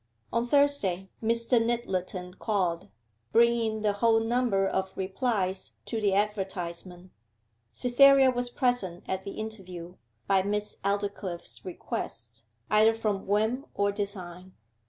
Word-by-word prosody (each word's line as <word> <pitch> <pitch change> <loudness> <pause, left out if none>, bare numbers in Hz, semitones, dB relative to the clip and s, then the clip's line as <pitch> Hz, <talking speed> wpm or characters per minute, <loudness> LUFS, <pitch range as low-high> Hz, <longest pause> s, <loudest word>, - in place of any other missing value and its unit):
On 235 +1 +1
Thursday 240 -10 +2
Mr. 230 +1 +2
Nyttleton 185 -6 -2
called, 185 -6 -1 0.4
bringing 230 0 +3
the 210 -1 +2
whole 225 +2 +3
number 225 -4 +1
of 190 0 -2
replies 190 -1 -1
to 225 -2 -3
the 200 -2 +2
advertisement. 185 -3 -3 0.6
Cytherea 270 +1 +6
was 245 0 -2
present 245 -9 0
at 190 +1 -3
the 200 - -5
interview, 185 -5 -7 0.3
by 195 -1 +3
Miss 210 +2 -2
Aldclyffe's 200 -3 -3
request 115 -10 -6 0.3
either 215 +1 +5
from 210 -4 -2
whim 220 +7 +1
or 200 0 +2
design. 185 -3 -5
205 Hz, 115 wpm, -28 LUFS, 185-230 Hz, 0.6 s, Cytherea